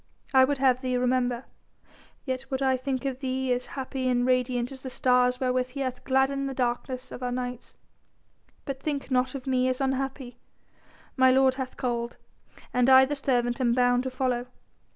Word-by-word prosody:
I 260 Hz, -1 st, +7 dB
would 285 Hz, +1 st, -1 dB
have 260 Hz, -1 st, +3 dB
thee 255 Hz, -1 st, -1 dB
remember, 250 Hz, 0 st, 0 dB, 0.8 s
yet 260 Hz, -1 st, -4 dB
would 265 Hz, 0 st, -2 dB
I 265 Hz, -1 st, +3 dB
think 260 Hz, +1 st, -3 dB
of 265 Hz, -2 st, -2 dB
thee 260 Hz, -1 st, -1 dB
as 245 Hz, 0 st, -3 dB
happy 260 Hz, -1 st, -2 dB
and 245 Hz, -1 st, +2 dB
radiant 250 Hz, -1 st, +1 dB
as 265 Hz, -1 st, -9 dB
the 260 Hz, -, -6 dB
stars 250 Hz, 0 st, +2 dB
wherewith 255 Hz, -1 st, 0 dB
He 275 Hz, +2 st, -6 dB
hath 255 Hz, -2 st, -3 dB
gladdened 275 Hz, +1 st, +1 dB
the 270 Hz, -, -6 dB
darkness 250 Hz, +1 st, -2 dB
of -, -, -8 dB
our 250 Hz, -1 st, -2 dB
nights. 250 Hz, -1 st, -5 dB, 0.9 s
But 275 Hz, -1 st, -4 dB
think 285 Hz, -3 st, -3 dB
not 255 Hz, +2 st, +1 dB
of 265 Hz, -, -6 dB
me 255 Hz, -1 st, +1 dB
as 255 Hz, -, -2 dB
unhappy. 265 Hz, -2 st, -3 dB, 0.8 s
My 260 Hz, -1 st, +5 dB
Lord 265 Hz, 0 st, +4 dB
has 260 Hz, -1 st, -5 dB
called, 240 Hz, -1 st, -3 dB, 0.6 s
and 250 Hz, +1 st, +3 dB
I 265 Hz, 0 st, +8 dB
the 290 Hz, +2 st, -3 dB
servant 245 Hz, -2 st, 0 dB
am 240 Hz, -2 st, +3 dB
bound 245 Hz, 0 st, +3 dB
to 260 Hz, -, -3 dB
follow. 255 Hz, -1 st, -1 dB
255 Hz, 185 wpm, -27 LUFS, 250-265 Hz, 0.9 s, I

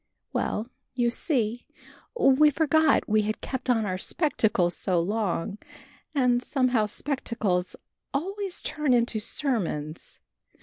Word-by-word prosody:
Well, 215 Hz, +2 st, -1 dB, 0.3 s
you 240 Hz, -2 st, +2 dB
see, 240 Hz, -4 st, -1 dB, 0.5 s
we 275 Hz, -, +6 dB
forgot 315 Hz, 0 st, +3 dB
we 215 Hz, 0 st, +3 dB
had 215 Hz, +1 st, -2 dB
kept 260 Hz, -1 st, -5 dB
on 225 Hz, -3 st, +3 dB
our 185 Hz, -2 st, -2 dB
spectacles 210 Hz, -, +1 dB
so 180 Hz, -2 st, +1 dB
long, 200 Hz, 0 st, -1 dB, 0.6 s
and 250 Hz, -3 st, +3 dB
somehow 255 Hz, -5 st, +1 dB
spectacles 210 Hz, -8 st, -2 dB, 0.4 s
always 385 Hz, +6 st, -3 dB
turn 300 Hz, -4 st, 0 dB
into 235 Hz, -2 st, +2 dB
sermons. 205 Hz, -, -2 dB
235 Hz, 115 wpm, -27 LUFS, 210-275 Hz, 0.6 s, we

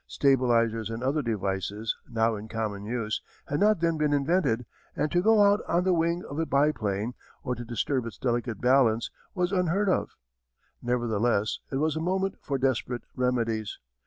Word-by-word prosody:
Stabilizers, 115 Hz, -5 st, +2 dB
and 115 Hz, +2 st, -5 dB
other 140 Hz, +4 st, +1 dB
devices, 105 Hz, -1 st, -2 dB
now 115 Hz, -1 st, +1 dB
in 105 Hz, +1 st, -7 dB
common 110 Hz, -3 st, -3 dB
use, 110 Hz, -1 st, -2 dB, 0.2 s
had 145 Hz, -, -2 dB
not 210 Hz, -3 st, +3 dB
then 165 Hz, -2 st, +1 dB
been 150 Hz, -1 st, +2 dB
invented 140 Hz, -5 st, +1 dB, 0.3 s
and 150 Hz, -, -1 dB
to 175 Hz, -, +3 dB
go 215 Hz, +1 st, +5 dB
out 205 Hz, +1 st, +4 dB
on 170 Hz, +2 st, +2 dB
the 185 Hz, 0 st, +3 dB
wing 170 Hz, +1 st, +1 dB
of 145 Hz, -, -5 dB
a 165 Hz, -, +1 dB
biplane, 120 Hz, -6 st, +1 dB, 0.3 s
or 125 Hz, -, -1 dB
to 120 Hz, 0 st, -6 dB
disturb 120 Hz, +2 st, -1 dB
its 110 Hz, -, -8 dB
delicate 120 Hz, -3 st, -1 dB
balance, 125 Hz, -3 st, +3 dB, 0.2 s
was 180 Hz, -1 st, 0 dB
unheard 190 Hz, +2 st, +1 dB
of. -, -, 0 dB, 0.7 s
Nevertheless 120 Hz, -3 st, 0 dB
it -, -, -2 dB
was 155 Hz, +2 st, +1 dB
a 160 Hz, -, -2 dB
moment 190 Hz, +3 st, -1 dB
for 140 Hz, -, -2 dB
desperate 130 Hz, -2 st, -1 dB
remedies. 115 Hz, -4 st, -1 dB
125 Hz, 170 wpm, -27 LUFS, 115-160 Hz, 0.7 s, go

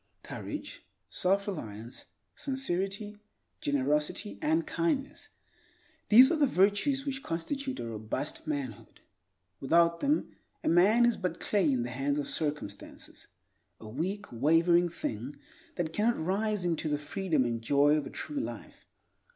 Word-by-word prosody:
Courage, -, -, -7 dB, 0.3 s
self 195 Hz, +2 st, +1 dB
reliance, 115 Hz, -, -6 dB, 0.3 s
sincerity, 205 Hz, -5 st, -3 dB, 0.4 s
generosity 150 Hz, -, 0 dB
and 320 Hz, +1 st, +2 dB
kindness—these 315 Hz, -2 st, +1 dB
are 335 Hz, -, +2 dB
the 290 Hz, -2 st, +4 dB
virtues 210 Hz, +7 st, +2 dB
which 270 Hz, -1 st, -3 dB
constitute 265 Hz, -, -3 dB
a -, -, -4 dB
robust 110 Hz, +8 st, -4 dB
manhood. 140 Hz, -8 st, -5 dB, 0.6 s
Without 170 Hz, +4 st, +3 dB
them, 290 Hz, +2 st, +1 dB, 0.3 s
a -, -, -2 dB
man 205 Hz, +8 st, +5 dB
is 240 Hz, -, +2 dB
but 180 Hz, -3 st, -3 dB
clay 190 Hz, -8 st, +2 dB
in 125 Hz, -3 st, +1 dB
the 120 Hz, -, -5 dB
hands 140 Hz, +3 st, -1 dB
of 145 Hz, -, -2 dB
circumstances; 145 Hz, -10 st, -5 dB, 0.5 s
a 110 Hz, -, -10 dB
weak, 185 Hz, -, -3 dB
wavering 165 Hz, +7 st, +4 dB
thing 130 Hz, -4 st, -5 dB, 0.4 s
that 165 Hz, -3 st, -2 dB
cannot 230 Hz, +5 st, +2 dB
rise 195 Hz, +3 st, 0 dB
into 165 Hz, -2 st, 0 dB
the 145 Hz, -, +1 dB
freedom 150 Hz, -1 st, 0 dB
and 115 Hz, -1 st, -2 dB
joy 145 Hz, +5 st, +4 dB
of 150 Hz, -2 st, -1 dB
a -, -, -7 dB
true 295 Hz, -1 st, -4 dB
life. -, -, -7 dB
175 Hz, 135 wpm, -30 LUFS, 145-235 Hz, 0.6 s, man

